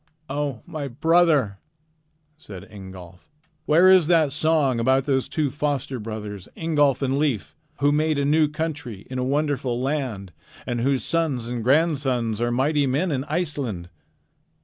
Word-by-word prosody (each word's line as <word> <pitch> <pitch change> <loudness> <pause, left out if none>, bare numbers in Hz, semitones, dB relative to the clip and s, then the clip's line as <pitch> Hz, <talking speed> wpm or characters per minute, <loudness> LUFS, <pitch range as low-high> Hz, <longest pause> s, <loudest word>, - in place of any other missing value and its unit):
"O 140 -5 -3
my 150 -3 -5
brother!" 150 - +2 0.8
said 100 - -10
Ingolf, 95 -3 -12 0.4
"where 170 +5 +5
is 185 -4 +6
that 160 -4 +3
song 150 -4 +1
about 130 +3 +2
'those 135 -2 0
two 145 -1 -1
foster 140 -2 -2
brothers, 105 -3 -7
Ingolf 145 -5 +1
and 135 +1 0
Leif, 110 - -1 0.3
who 145 +1 +4
made 155 +1 +1
a 140 - 0
new 155 +2 +3
country 145 -9 -5
in 130 - -3
a - - 0
wonderful 135 -3 -1
land, 130 -9 -3 0.3
and 120 -1 -2
whose 135 +1 +1
sons 145 -8 -1
and 120 -2 -3
grandsons 130 -6 +1
are 120 - +1
mighty 140 +3 +1
men 150 +7 0
in 135 -1 -2
Iceland'? 140 - -3
140 Hz, 150 wpm, -23 LUFS, 120-150 Hz, 0.8 s, is